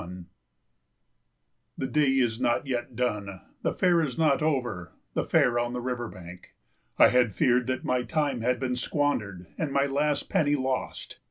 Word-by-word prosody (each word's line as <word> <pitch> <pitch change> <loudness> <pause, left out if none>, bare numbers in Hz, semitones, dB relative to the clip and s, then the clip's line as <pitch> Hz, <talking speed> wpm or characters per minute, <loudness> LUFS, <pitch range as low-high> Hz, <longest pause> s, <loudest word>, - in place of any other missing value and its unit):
71 90 +1 -9 1.5
The - - -2
day 150 +1 +2
is 120 -3 +1
not 120 +4 +1
yet 125 -2 -3
done, 105 -6 -2 0.2
the - - 0
fair 175 -2 +3
is 140 -6 -3
not 155 -4 +3
over, 125 - -2 0.2
the - - 0
fair 120 -1 +2
on 120 0 -2
the 125 - -3
river 120 -1 -3
bank. 90 -2 -12 0.4
I - - +7
had 125 -3 +3
feared 125 +2 +2
that 130 0 -2
my 125 -1 +1
time 140 -2 -1
had 125 +1 0
been 125 -1 -1
squandered 125 - -1
and 155 -3 -1
my 140 0 +2
last 145 +1 0
penny 145 -2 +2
lost. 130 -2 -3
125 Hz, 170 wpm, -27 LUFS, 120-140 Hz, 1.5 s, I